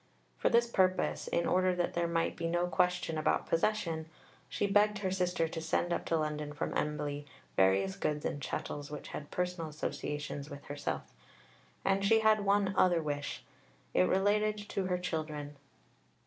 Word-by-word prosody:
For - - +3
this 235 0 +5
purpose, 185 -5 +1
in 170 - +1
order 185 0 +3
that 175 -1 0
there 170 0 +1
might 165 0 0
be 165 - -2
no 175 +1 +1
question 180 -2 +1
about 155 - +1
possession, 165 -3 0 0.4
she - - 0
begged 210 +1 +4
her 190 -2 -1
sister 180 -3 +1
to 160 0 -5
send 170 +2 0
up - - -2
to 165 - +1
London 150 -1 -2
from 150 - -3
Embley 145 -1 -2 0.3
various 95 0 +3
goods 150 -1 -1
and 145 - -2
chattels 145 +1 -4
which 150 -1 -7
had 145 - -6
personal 180 -3 -2
association 150 -1 -4
with 140 0 -9
herself. 145 0 -4 0.7
And 195 0 +2
she 220 +2 +5
had 215 -1 +4
one 200 -1 +2
other 180 -2 +4
wish; 145 -1 -3 0.5
it 90 - +4
related 210 +2 +2
to 195 - -1
her 180 -1 +1
"children." 155 -4 -4
170 Hz, 165 wpm, -32 LUFS, 150-190 Hz, 0.7 s, this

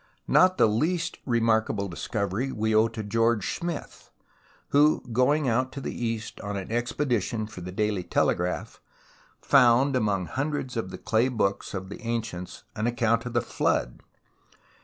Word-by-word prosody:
Not 185 0 +5
the - - +6
least 160 +11 0
remarkable 110 -4 +1
discovery 100 +6 -2
we 110 -1 -1
owe 110 +1 +5
to 115 -1 -6
George 115 -3 +1
Smith, 170 -2 -6 0.6
who, 150 +2 +4
going 140 +4 +3
out 130 +2 +1
to 140 - -5
the 135 - -4
East 115 -2 -4
on 100 -1 -4
an 95 +2 -6
expedition 120 -2 -1
for 105 -4 -10
the 90 +1 -6
Daily 105 0 0
Telegraph, 90 +1 -1 0.6
found 130 +1 +5
among 105 -6 +1
hundreds 135 - -3
of 115 -5 -2
the - - -7
clay 115 +2 +1
books 100 -6 -1
of 95 0 -5
the 100 - -8
ancients 115 -6 -4
an 110 +2 -1
account 115 0 +1
of 120 - -6
the 120 -3 +1
Flood. - - -1
115 Hz, 155 wpm, -26 LUFS, 105-130 Hz, 0.6 s, the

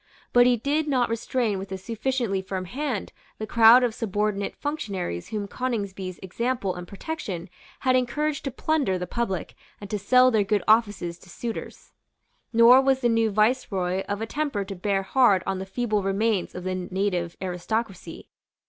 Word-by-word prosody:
But 245 0 +6
he 245 -1 +4
did 295 +6 0
not 250 -5 +1
restrain 230 -2 -1
with 195 0 -8
a 190 - -3
sufficiently 225 0 -2
firm 190 -1 -4
hand 255 +1 -4 0.2
the 215 - -4
crowd 230 +3 +7
of 240 -3 +1
subordinate 210 -2 -2
functionaries 200 - -4
whom 210 -2 -4
Coningsby's 200 -7 -4
example 230 0 -2
and 180 0 -8
protection 200 - -6 0.3
had 255 -1 +3
encouraged 285 +4 0
to - - 0
plunder 270 -6 0
the 180 - -3
public 190 -3 -3 0.3
and 200 -1 -9
to 210 - -1
sell 255 +5 +5
their 215 -3 +3
good 205 +1 0
offices 205 -6 +2
to 185 - -17
suitors. 230 +6 -7 0.6
Nor 235 +3 +7
was 265 -1 +2
the 240 - +3
new 225 -1 +2
Viceroy 200 -4 +1
of 205 +1 -2
a - - -1
temper 275 -6 -2
to 195 0 -6
bear 195 +1 0
hard 200 -3 +3
on 190 -1 -2
the 190 - -6
feeble 215 0 -1
remains 195 0 0
of 180 - -6
the 185 0 -2
native 185 -1 -2
aristocracy. 185 0 -4
215 Hz, 170 wpm, -25 LUFS, 190-245 Hz, 0.6 s, crowd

